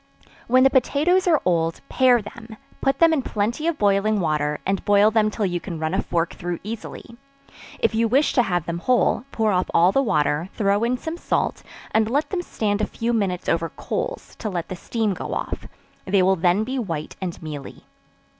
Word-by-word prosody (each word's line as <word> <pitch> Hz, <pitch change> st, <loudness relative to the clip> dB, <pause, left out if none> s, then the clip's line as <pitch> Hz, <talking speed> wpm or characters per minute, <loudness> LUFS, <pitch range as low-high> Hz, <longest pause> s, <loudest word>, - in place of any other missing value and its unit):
When 255 Hz, +2 st, +5 dB
the 270 Hz, -, +5 dB
potatoes 315 Hz, -, +2 dB
are 320 Hz, -4 st, +4 dB
old, 165 Hz, -2 st, +1 dB
pare 250 Hz, -4 st, +3 dB
them, 225 Hz, +1 st, -11 dB, 0.2 s
put 270 Hz, -, +1 dB
them 330 Hz, -1 st, +5 dB
in 300 Hz, -, +1 dB
plenty 235 Hz, +7 st, -2 dB
of 335 Hz, -2 st, 0 dB
boiling 205 Hz, +1 st, +2 dB
water, 150 Hz, -3 st, 0 dB
and 195 Hz, 0 st, -1 dB
boil 205 Hz, +1 st, +4 dB
them 215 Hz, -1 st, +3 dB
till 210 Hz, 0 st, -2 dB
you 175 Hz, -2 st, -1 dB
can 170 Hz, -2 st, -6 dB
run 160 Hz, +2 st, -2 dB
a 190 Hz, -, +1 dB
fork 170 Hz, -1 st, -1 dB
through 175 Hz, 0 st, -4 dB
easily; 230 Hz, +2 st, -8 dB, 0.6 s
if -, -, +1 dB
you 225 Hz, +1 st, +2 dB
wish 270 Hz, +6 st, +2 dB
to 250 Hz, -, +4 dB
have 175 Hz, -7 st, -1 dB
them 170 Hz, 0 st, -3 dB
whole, 250 Hz, +4 st, +2 dB
pour 220 Hz, -2 st, +1 dB
off 180 Hz, -1 st, 0 dB
all 175 Hz, +3 st, +5 dB
the 270 Hz, -, +2 dB
water, 150 Hz, -, 0 dB
throw 200 Hz, +1 st, +1 dB
in 245 Hz, +2 st, +1 dB
some 320 Hz, +6 st, -5 dB
salt, -, -, -1 dB, 0.3 s
and 220 Hz, 0 st, +2 dB
let 285 Hz, +5 st, 0 dB
them 375 Hz, -3 st, -1 dB
stand 215 Hz, -10 st, -2 dB
a -, -, 0 dB
few 235 Hz, +1 st, -2 dB
minutes 195 Hz, -5 st, -1 dB
over 165 Hz, 0 st, 0 dB
coals, -, -, -5 dB
to 215 Hz, -, -4 dB
let 175 Hz, -4 st, -4 dB
the 185 Hz, -, -4 dB
steam 215 Hz, +2 st, -1 dB
go -, -, -5 dB
off; -, -, -4 dB, 0.4 s
they 190 Hz, 0 st, +3 dB
will 190 Hz, +1 st, +4 dB
then 180 Hz, +4 st, +2 dB
be 260 Hz, +3 st, -3 dB
white 165 Hz, -9 st, -4 dB
and 180 Hz, -3 st, -4 dB
mealy. 150 Hz, -3 st, -8 dB
210 Hz, 205 wpm, -23 LUFS, 175-245 Hz, 0.6 s, When